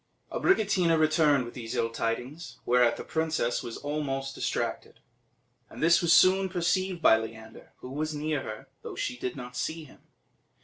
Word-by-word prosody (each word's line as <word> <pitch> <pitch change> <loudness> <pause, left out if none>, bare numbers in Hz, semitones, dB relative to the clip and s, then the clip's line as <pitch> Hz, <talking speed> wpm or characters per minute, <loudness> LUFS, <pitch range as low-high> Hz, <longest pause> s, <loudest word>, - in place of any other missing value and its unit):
Abricotina 195 - +2
returned 155 -4 +3
with 120 - -9
these 115 -3 -6
ill 115 - 0
tidings, 120 +8 -4
whereat 125 -1 +3
the - - -6
princess 160 -7 -1
was 115 - -6
almost 135 -2 -3
distracted; - - -3 0.7
and - - -7
this 170 +1 +5
was 170 -2 +2
soon 190 +2 +5
perceived 180 0 -1
by 110 - +7
Leander, 110 0 -10
who 125 - -8
was 155 +3 -2
near 150 -1 -1
her, 110 -3 -8
though - - -8
she - - -3
did 125 0 -4
not 125 -2 -8
see 160 +5 -3
him. 140 - -16
150 Hz, 165 wpm, -28 LUFS, 125-165 Hz, 0.7 s, by